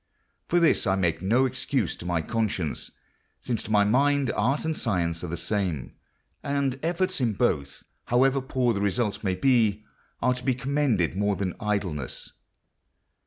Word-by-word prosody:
For 175 - +3
this 165 -10 +3
I 95 - +3
make 85 -4 0
no 115 +8 +3
excuse 130 -4 -1
to 85 - -8
my 85 -2 0
conscience, 100 -6 -2 0.5
since 115 -3 -2
to - - -7
my 105 -1 +5
mind 140 +5 +2
art 135 +9 0
and 160 0 0
science 85 - -1
are - - -3
the 85 +1 -4
same, 90 - -2 0.5
and 140 -2 -1
efforts 180 0 -1
in 115 -3 +1
both, 70 - -1 0.2
however 135 +3 +3
poor 125 -2 0
the 100 - -2
result 105 +2 -1
may 95 -2 0
be, 110 -4 +2 0.3
are 125 - +2
to 125 0 -8
be 130 -2 +1
commended 130 - 0
more 100 +1 +1
than 95 -2 -2
idleness. 100 -10 -3
110 Hz, 165 wpm, -26 LUFS, 95-130 Hz, 0.5 s, my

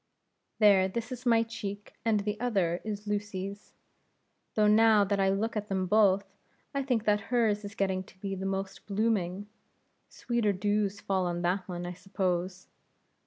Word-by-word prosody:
"There; 200 -3 +6
this 230 +5 -4
is 250 0 -5
my 230 -1 +5
cheek, 205 -3 -7
and 215 -2 +2
the 210 +1 -3
other 195 -8 0
is 210 -1 -5
Lucy's; 205 -1 -4 0.8
though 215 - +4
now 215 0 +6
that 200 0 0
I 195 0 +3
look 215 +4 -1
at 210 -1 -2
them 190 -2 -1
both, 200 0 +4 0.5
I 280 - 0
think 250 -5 0
that 210 -1 +3
hers 220 -4 +2
is 205 0 -8
getting 190 -1 0
to - - -19
be 195 0 -4
the 190 0 -3
most 195 0 -4
blooming; 205 -2 0 0.6
sweeter 235 -4 0
dews 205 +1 0
fall 190 -2 0
on 175 0 -2
that 180 +2 0
one, 175 -1 -5
I 175 - -4
suppose." 185 -1 -2
200 Hz, 165 wpm, -29 LUFS, 190-215 Hz, 0.8 s, There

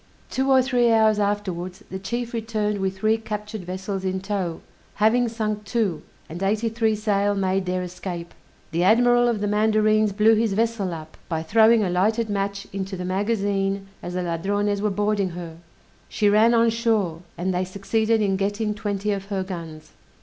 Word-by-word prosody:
Two 265 +1 0
or 260 -1 +5
three 245 -2 +2
hours 220 -1 +4
afterwards 190 -3 -2
the 190 - -4
chief 235 +5 -4
returned 215 -2 -1
with 190 0 -2
three 220 +3 +2
captured 210 -2 -6
vessels 190 +1 -4
in 190 0 -1
tow, 190 -4 -3 0.3
having 235 +3 +3
sunk 215 -2 -3
two, 205 -7 -1 0.3
and 170 +3 -8
eighty 215 +4 +1
three 225 -1 +1
sail 205 -1 +1
made 190 -1 0
their 180 0 -1
escape. 175 -1 -6 0.4
The 170 +2 +1
admiral 240 +4 +5
of 230 -4 0
the 205 - 0
mandarines 215 0 +3
blew 215 +3 +4
his 220 -2 +1
vessel 220 -3 0
up, 160 -1 -8
by 160 -2 -2
throwing 220 +5 +5
a 190 - 0
lighted 215 +5 +1
match 200 0 -2
into 195 0 -4
the 180 - -4
magazine 195 0 -1
as 175 0 -6
the 180 - -1
Ladrones 200 +4 -1
were 210 - +1
boarding 205 -1 0
her; 165 -2 -7 0.5
she 210 - +1
ran 225 +3 +5
on 230 0 +4
shore, 220 -8 0 0.2
and 185 +2 -1
they 180 +1 0
succeeded 215 +4 0
in 195 -2 +1
getting 205 +2 -1
twenty 205 0 -2
of 195 -1 -3
her 195 -2 -2
guns. 165 -4 -8
205 Hz, 180 wpm, -23 LUFS, 190-220 Hz, 0.5 s, or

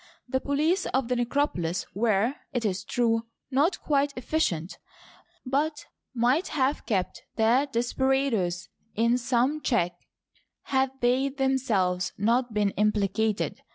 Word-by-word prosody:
The 260 +1 0
police 310 +7 +1
of 260 -2 -1
the 250 - +1
necropolis 240 - -1
were, 220 +3 +2 0.2
it 245 -3 -1
is 195 -1 -1
true, 230 +1 0 0.2
not 295 +7 +2
quite 285 -1 +1
efficient, 195 - -1 0.7
but 295 +4 -1 0.3
might 250 +9 +2
have 275 0 -1
kept 190 -6 -1
the 240 +6 +3
desperadoes 240 -7 0 0.3
in 235 +3 +2
some 250 +5 +1
check 180 -11 +1 0.7
had 265 -1 +1
they 255 +3 +2
themselves 230 -10 0
not 235 +4 +1
been 210 -2 +1
implicated. 210 +1 0
245 Hz, 120 wpm, -27 LUFS, 210-270 Hz, 0.7 s, the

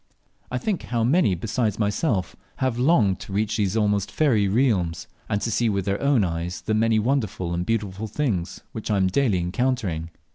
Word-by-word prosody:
I - - -2
think 215 -6 -1
how 120 -2 -1
many 130 - +3
besides 110 +3 -1
my 105 -2 +1
self 105 - -1 0.2
have 130 -3 -1
longed 125 - +3
to 95 - -8
reach 110 +2 0
these 100 0 0
almost 105 -2 +1
fairy 115 -10 +2
realms, 95 -7 +1 0.2
and 100 - +1
to 115 - -1
see 115 +1 +2
with 100 -3 -1
their 100 0 -1
own 140 -6 +3
eyes 85 0 -3
the 110 - -1
many 110 +1 +3
wonderful 105 -7 0
and 85 +1 -1
beautiful 105 0 -2
things 105 - -2
which 110 - -6
I 105 - +2
am 95 - +3
daily 100 +1 +2
encountering. 90 -3 -1
105 Hz, 190 wpm, -24 LUFS, 95-120 Hz, 0.2 s, many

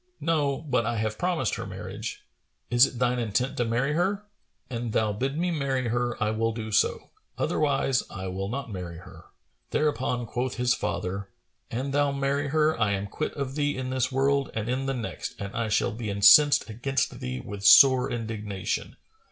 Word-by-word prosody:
"No; 145 -4 +1
but 130 -6 +1
I 115 - -1
have 110 0 -2
promised 175 - 0
her - - -5
marriage." - - -7 0.5
"Is 120 +2 +6
it 125 - -9
thine 125 0 +1
intent 120 +3 -1
to 120 - +1
marry 125 +6 0
her?" 195 +5 0 0.4
"An 120 -1 -4
thou 110 -1 +1
bid 135 +7 -2
me 175 +2 0
marry 135 -5 -1
her, 120 +1 -1
I 110 0 +1
will 115 +1 0
do 110 -1 -5
so; 105 - +1 0.3
otherwise 135 -3 +1
I 95 -1 -6
will 95 +1 -4
not 135 0 -4
marry 90 -3 -6
her." 85 - -13 0.4
Thereupon 125 -4 0
quoth 125 +3 -3
his 125 0 +2
father, 95 -2 -3 0.4
"An 130 +4 -3
thou 145 0 +2
marry 140 +1 -1
her, 155 +2 +2
I 105 -3 +2
am 100 0 -2
quit 125 +9 -4
of 140 -2 -3
thee 145 -1 -1
in 130 0 -3
this 130 0 0
world 135 +1 +1
and 110 -1 -2
in 130 +2 -1
the 135 - -1
next, 120 -2 -5
and 100 0 -5
I 115 -1 -1
shall 110 - +1
be 110 -1 -5
incensed 105 +9 +6
against 125 +5 -2
thee 65 0 -4
with 100 +5 -8
sore 130 +5 +7
indignation. 110 -3 -4
125 Hz, 185 wpm, -27 LUFS, 110-140 Hz, 0.5 s, sore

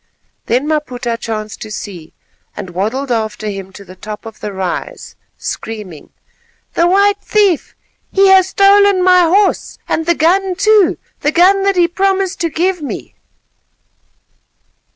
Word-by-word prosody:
Then 255 +5 0
Maputa 255 -6 -2
chanced 215 -2 -6
to 215 - -7
see, 185 -6 -8 0.4
and 190 -3 -6
waddled 225 +9 -2
after 220 -2 -2
him 195 -1 -7
to 200 +1 -12
the 185 - -13
top 210 +4 -8
of 225 -1 -10
the 210 - -5
rise, 190 -2 -5 0.2
screaming:— 210 -9 -7 0.6
"The 340 - +2
white 400 +2 +3
thief, 405 -6 +1 0.4
he 390 0 +4
has 380 -1 +6
stolen 395 -1 +4
my 365 0 +5
horse, 390 +4 +1
and 325 0 -2
the 340 - +3
gun 365 +4 +1
too, 415 -2 +3 0.2
the 295 - 0
gun 375 +4 +4
that 395 0 +2
he 350 -1 +4
promised 385 +1 -1
to 335 - 0
give 355 +3 -1
me." 290 - -6
325 Hz, 145 wpm, -15 LUFS, -, 0.6 s, has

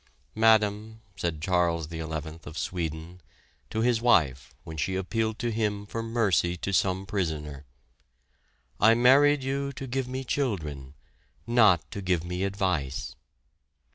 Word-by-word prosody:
"Madam," 110 0 +2 0.2
said 80 -3 -3
Charles 85 -4 +1
XI 80 - -5
of 80 0 -7
Sweden 85 0 -4 0.5
to 110 - -2
his 120 -1 +2
wife 70 - +2
when 80 - -8
she 95 +5 -1
appealed 110 +4 -1
to 120 - -2
him 105 -2 -1
for 115 +2 -4
mercy 105 -7 +1
to 100 +3 -4
some 95 0 +1
prisoner, 75 -8 -3 1.1
"I 110 +2 +6
married 135 +4 +5
you 140 +1 -2
to 135 - -6
give 130 0 -2
me 130 +1 -4
children, 80 - -3 0.5
not 110 -8 +5
to 100 - -5
give 90 -3 0
me 90 +2 -2
advice." 95 -9 -2
95 Hz, 135 wpm, -27 LUFS, 80-115 Hz, 1.1 s, I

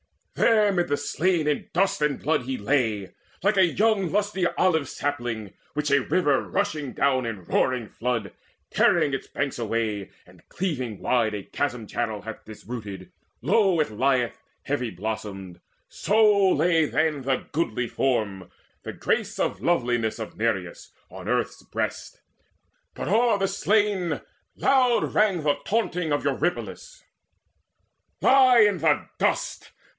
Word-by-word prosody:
There 215 -3 +4
mid 175 -2 0
the 145 - 0
slain 160 +3 0
in 150 - -1
dust 190 -2 +1
and 150 -2 +1
blood 155 -3 0
he 130 +1 -3
lay, 105 -4 0 0.3
Like 205 +1 +2
a 190 - +6
young 195 0 +1
lusty 200 -3 +1
olive 160 -6 +1
sapling, 120 -8 -3 0.2
which 150 -1 -1
A 140 - +5
river 145 -1 +2
rushing 155 - -2
down 130 -3 +1
in 105 -5 -5
roaring 125 +5 0
flood, 115 -5 -3 0.4
Tearing 140 - +3
its 135 - -3
banks 140 -3 -3
away, 110 -3 -2 0.2
and - - -19
cleaving 130 - -3
wide 115 -4 +1
A 100 - -5
chasm 125 -3 -3
channel, 110 -1 -3
hath 110 0 -8
disrooted; 105 -2 -8 0.3
low 190 - +3
It 150 - 0
lieth 125 +2 0 0.2
heavy 130 -4 -2
blossomed; 95 -2 -6 0.3
so 210 -2 +3
lay 165 -3 +3
then 155 -1 0
The 130 0 -1
goodly 125 -6 -1
form, 105 -8 -1 0.3
the - - -7
grace - - -1
of 95 - -1
loveliness 120 -7 +1
Of 110 -2 -7
Nireus 105 -6 -3 0.2
on - - -9
earth's - - -1
breast. - - -5 0.7
But - - -5
o'er 225 +1 +3
the 195 0 0
slain 200 -2 +1 0.3
Loud 255 -3 +2
rang 195 -6 +2
the 145 -1 +2
taunting 180 -7 -1
of 145 - 0
Eurypylus: - - -3 1.2
"Lie 255 -4 +6
there 160 -5 +2
in - - -19
dust! - - -1
145 Hz, 140 wpm, -25 LUFS, 115-185 Hz, 1.2 s, a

